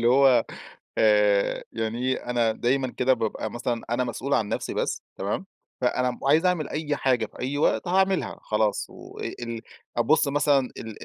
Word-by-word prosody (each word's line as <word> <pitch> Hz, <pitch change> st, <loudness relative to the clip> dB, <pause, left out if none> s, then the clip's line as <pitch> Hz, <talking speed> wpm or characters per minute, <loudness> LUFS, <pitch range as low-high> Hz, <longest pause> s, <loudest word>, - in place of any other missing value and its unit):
اللي 120 Hz, -, +3 dB
هو 130 Hz, -2 st, +5 dB, 0.5 s
آآ، 105 Hz, -2 st, +3 dB
يعني 115 Hz, +1 st, -3 dB
إيه، 130 Hz, -, -3 dB
أنا 120 Hz, -2 st, +2 dB
دايمًا 130 Hz, +4 st, 0 dB
كده 130 Hz, +1 st, +4 dB
بابقى 110 Hz, -2 st, -3 dB
مثلًا 120 Hz, -1 st, -2 dB
أنا 120 Hz, +2 st, +1 dB
مسؤول 125 Hz, +3 st, -3 dB
عن 105 Hz, -2 st, +1 dB
نفسي -, -, -2 dB
بس -, -, -1 dB, 0.2 s
تمام؟ -, -, -2 dB, 0.4 s
فأنا 125 Hz, -1 st, 0 dB
عايز 155 Hz, +5 st, +4 dB
أعمل 180 Hz, -5 st, +1 dB
أي 150 Hz, -1 st, -2 dB
حاجة 125 Hz, -5 st, +1 dB
في -, -, -15 dB
أي 135 Hz, +3 st, -2 dB
وقت 155 Hz, -, +1 dB
هاعملها 190 Hz, +1 st, +1 dB
خلاص، 105 Hz, -1 st, 0 dB
وال 115 Hz, -1 st, -7 dB, 0.4 s
أبص 145 Hz, +5 st, +3 dB
مثلًا 145 Hz, 0 st, +3 dB, 0.2 s
ال 110 Hz, -2 st, -8 dB
125 Hz, 165 wpm, -25 LUFS, 115-140 Hz, 0.5 s, هو